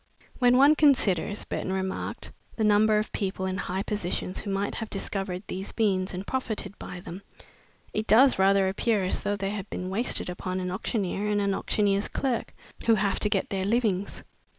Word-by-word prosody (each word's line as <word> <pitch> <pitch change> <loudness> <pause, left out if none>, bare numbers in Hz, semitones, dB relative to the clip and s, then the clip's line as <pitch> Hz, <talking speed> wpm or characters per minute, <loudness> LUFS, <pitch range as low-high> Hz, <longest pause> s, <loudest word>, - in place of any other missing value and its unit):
"When 245 0 +5
one 280 +3 +7
considers," 215 - +2
Burton 190 - -3
remarked, 190 0 -3 0.2
"the 220 - -1
number 210 0 +4
of 215 - -1
people 190 -2 -2
in 185 0 -2
high 190 +2 -2
positions 190 -3 -3
who 205 - -6
might 195 +1 -1
have 225 -2 -5
discovered 195 -2 -2
these 190 +1 -6
beans 195 -4 +1
and 185 +1 -5
profited 220 -6 -3
by 180 - -7
them, 180 +2 -8 0.7
it 215 +1 -2
does 255 +1 +6
rather 195 0 +4
appear 205 +1 +1
as 185 - -1
though 205 - -1
they 195 0 -2
had 205 -1 -5
been 185 +1 -4
wasted 230 +6 -1
upon 185 +1 -3
an 180 -1 -3
auctioneer 200 0 -2
and 210 0 +1
an 200 -1 +1
auctioneer's 200 0 +1
clerk 255 -4 -2 0.4
who 225 - +6
have 200 -1 0
to 210 - +1
get 200 -2 0
their 190 -1 -1
livings." 205 -2 0
200 Hz, 185 wpm, -27 LUFS, 190-215 Hz, 0.7 s, one